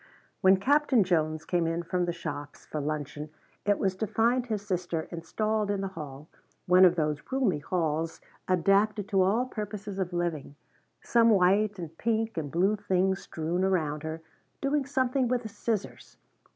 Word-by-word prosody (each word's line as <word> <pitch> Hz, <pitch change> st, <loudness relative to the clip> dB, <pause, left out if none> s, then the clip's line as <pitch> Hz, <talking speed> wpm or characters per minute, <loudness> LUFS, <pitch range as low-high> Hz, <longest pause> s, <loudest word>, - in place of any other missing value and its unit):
When 190 Hz, 0 st, +6 dB
Captain 275 Hz, +1 st, +3 dB
Jones 155 Hz, -3 st, 0 dB
came 175 Hz, -2 st, +1 dB
in 165 Hz, +1 st, -1 dB
from 180 Hz, +1 st, -1 dB
the 175 Hz, -, -1 dB
shops 145 Hz, -4 st, -7 dB
for 155 Hz, -, -4 dB
luncheon 150 Hz, 0 st, -4 dB, 0.4 s
it 205 Hz, -, +4 dB
was 190 Hz, -1 st, 0 dB
to 220 Hz, -, -1 dB
find 240 Hz, +4 st, +1 dB
his 215 Hz, -3 st, -2 dB
sister 175 Hz, -4 st, -2 dB
installed 215 Hz, +5 st, -1 dB
in 200 Hz, -1 st, 0 dB
the 195 Hz, -, -2 dB
hall, 150 Hz, -5 st, -9 dB, 0.4 s
one 180 Hz, +1 st, +7 dB
of 180 Hz, -1 st, +5 dB
those 150 Hz, -3 st, -1 dB
roomy 245 Hz, -, +1 dB
halls 160 Hz, 0 st, -1 dB, 0.3 s
adapted 195 Hz, +3 st, +2 dB
to 195 Hz, -1 st, +3 dB
all 210 Hz, +7 st, +2 dB
purposes 210 Hz, -4 st, -6 dB
of 185 Hz, -1 st, -1 dB
living, 170 Hz, -5 st, -3 dB, 0.5 s
some 230 Hz, -1 st, +4 dB
white 200 Hz, +1 st, +3 dB
and 165 Hz, -3 st, -7 dB
pink 225 Hz, 0 st, 0 dB
and 155 Hz, -4 st, -3 dB
blue 190 Hz, +5 st, +2 dB
things 190 Hz, -1 st, 0 dB
strewn 170 Hz, +3 st, -2 dB
around 155 Hz, -6 st, 0 dB
her, 160 Hz, +1 st, -5 dB, 0.4 s
doing 275 Hz, 0 st, 0 dB
something 260 Hz, -1 st, +1 dB
with 245 Hz, -1 st, -1 dB
a -, -, -4 dB
scissors. 215 Hz, -1 st, -4 dB
185 Hz, 165 wpm, -28 LUFS, 165-215 Hz, 0.5 s, one